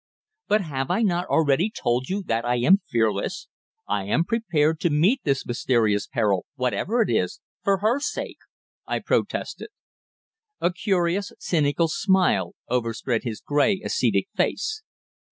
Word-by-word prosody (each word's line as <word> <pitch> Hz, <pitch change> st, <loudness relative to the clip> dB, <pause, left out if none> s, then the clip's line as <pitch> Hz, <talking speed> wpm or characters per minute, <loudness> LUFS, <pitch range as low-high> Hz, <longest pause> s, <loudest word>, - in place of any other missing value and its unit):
"But 210 Hz, +1 st, +3 dB
have 135 Hz, -6 st, -3 dB
I 195 Hz, +6 st, +1 dB
not 180 Hz, -3 st, +1 dB
already 160 Hz, +5 st, +2 dB
told 125 Hz, -, -1 dB
you 195 Hz, +2 st, -2 dB
that 115 Hz, -3 st, 0 dB
I 120 Hz, 0 st, +1 dB
am 145 Hz, +12 st, +4 dB
fearless? 110 Hz, -, 0 dB, 0.4 s
I 95 Hz, -, -1 dB
am 105 Hz, +11 st, +2 dB
prepared 160 Hz, -8 st, +1 dB
to 170 Hz, -, +1 dB
meet 175 Hz, -, +3 dB
this 135 Hz, -3 st, 0 dB
mysterious 115 Hz, -4 st, +1 dB
peril, 105 Hz, -8 st, 0 dB
whatever 165 Hz, -, 0 dB
it -, -, -4 dB
is, 90 Hz, -5 st, 0 dB, 0.2 s
for 195 Hz, -1 st, +2 dB
her 225 Hz, +6 st, +2 dB
sake!" 295 Hz, -, -4 dB, 0.5 s
I -, -, 0 dB
protested. -, -, -2 dB, 0.9 s
A 175 Hz, -, +1 dB
curious, 185 Hz, +1 st, 0 dB
cynical 155 Hz, 0 st, +1 dB
smile 175 Hz, -, +1 dB
overspread 115 Hz, 0 st, -1 dB
his 115 Hz, -3 st, -4 dB
grey, 165 Hz, +7 st, +2 dB
ascetic 465 Hz, -, +1 dB
face. 435 Hz, 0 st, -1 dB
155 Hz, 140 wpm, -24 LUFS, 120-195 Hz, 0.9 s, am